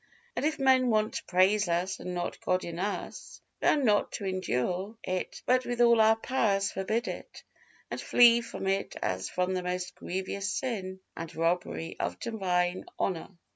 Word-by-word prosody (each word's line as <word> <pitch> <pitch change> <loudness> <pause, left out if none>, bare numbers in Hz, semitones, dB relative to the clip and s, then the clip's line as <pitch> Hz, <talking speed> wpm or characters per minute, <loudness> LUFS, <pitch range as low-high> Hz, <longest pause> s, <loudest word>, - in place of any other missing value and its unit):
And - - -2
if 310 0 -1
men 260 -2 +4
want 215 -1 +2
to - - -4
praise 190 +2 +3
us 175 +3 0
and 180 0 -5
not 175 0 -3
God 185 0 +1
in 170 0 -5
us, 200 +2 -4 0.2
we - - +2
are - - +6
not 215 -8 +2
to 200 - -4
endure 185 - -1
it, 185 0 -3
but 255 0 +3
with 245 -1 -3
all 235 -1 +6
our 220 0 +6
powers 210 -5 +1
forbid 215 +5 -1
it - - -7 0.5
and - - -3
flee 235 -1 +6
from 230 - -6
it 195 +1 -1
as 95 0 -1
from 180 +1 0
the 185 - -1
most 180 0 -3
grievous 195 +2 -3
sin 190 -7 -3
and 165 0 -7
robbery 165 0 -1
of - - -2
divine 185 -5 0
honor. 175 -4 -1
190 Hz, 175 wpm, -29 LUFS, 180-225 Hz, 0.5 s, are